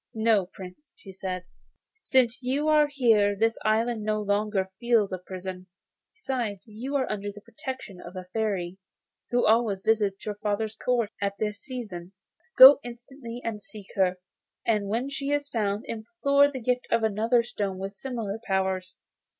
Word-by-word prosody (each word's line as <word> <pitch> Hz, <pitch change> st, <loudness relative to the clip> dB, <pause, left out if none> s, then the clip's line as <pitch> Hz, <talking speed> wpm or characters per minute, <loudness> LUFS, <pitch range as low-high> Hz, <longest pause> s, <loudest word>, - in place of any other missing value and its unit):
'No, 220 Hz, -4 st, +3 dB
Prince,' 190 Hz, +11 st, -12 dB
she 195 Hz, -, -12 dB
said; 185 Hz, -1 st, -4 dB, 0.6 s
'since 255 Hz, -, +2 dB
you 270 Hz, +4 st, 0 dB
are 305 Hz, -1 st, +5 dB
here 225 Hz, -8 st, +3 dB
this 225 Hz, +2 st, +1 dB
island 225 Hz, +1 st, +1 dB
no 215 Hz, 0 st, 0 dB
longer 205 Hz, -2 st, 0 dB
feels 230 Hz, -5 st, +2 dB
a 185 Hz, -, -3 dB
prison. 185 Hz, 0 st, -7 dB, 0.5 s
Besides, 235 Hz, -8 st, -3 dB
you 240 Hz, +6 st, -5 dB
are 265 Hz, -2 st, +2 dB
under 205 Hz, -1 st, -3 dB
the 205 Hz, -, -12 dB
protection 230 Hz, -4 st, -7 dB
of 175 Hz, +2 st, -10 dB
a 185 Hz, 0 st, -6 dB
Fairy, 195 Hz, -5 st, -1 dB, 0.5 s
who 245 Hz, 0 st, +2 dB
always 215 Hz, -3 st, +3 dB
visits 210 Hz, -3 st, +1 dB
your 210 Hz, -, -2 dB
father's 210 Hz, +1 st, -2 dB
court 235 Hz, -2 st, 0 dB
at 200 Hz, 0 st, 0 dB
this 210 Hz, -1 st, -2 dB
season. 205 Hz, -10 st, -7 dB, 0.4 s
Go 265 Hz, +2 st, +11 dB
instantly 240 Hz, 0 st, -9 dB
and 220 Hz, -2 st, -3 dB
seek 200 Hz, 0 st, -12 dB
her, 185 Hz, -2 st, +2 dB, 0.5 s
and 210 Hz, -3 st, +1 dB
when 230 Hz, +6 st, -1 dB
she 280 Hz, 0 st, -4 dB
is 290 Hz, 0 st, 0 dB
found 210 Hz, -3 st, -1 dB
implore 280 Hz, +4 st, +2 dB
the 270 Hz, -2 st, -6 dB
gift 250 Hz, +1 st, 0 dB
of 230 Hz, -1 st, +2 dB
another 225 Hz, +3 st, +2 dB
stone 205 Hz, -5 st, -3 dB
with 195 Hz, +1 st, -5 dB
similar 225 Hz, -2 st, -4 dB
powers. 190 Hz, -1 st, -1 dB
215 Hz, 160 wpm, -27 LUFS, 195-245 Hz, 0.6 s, Go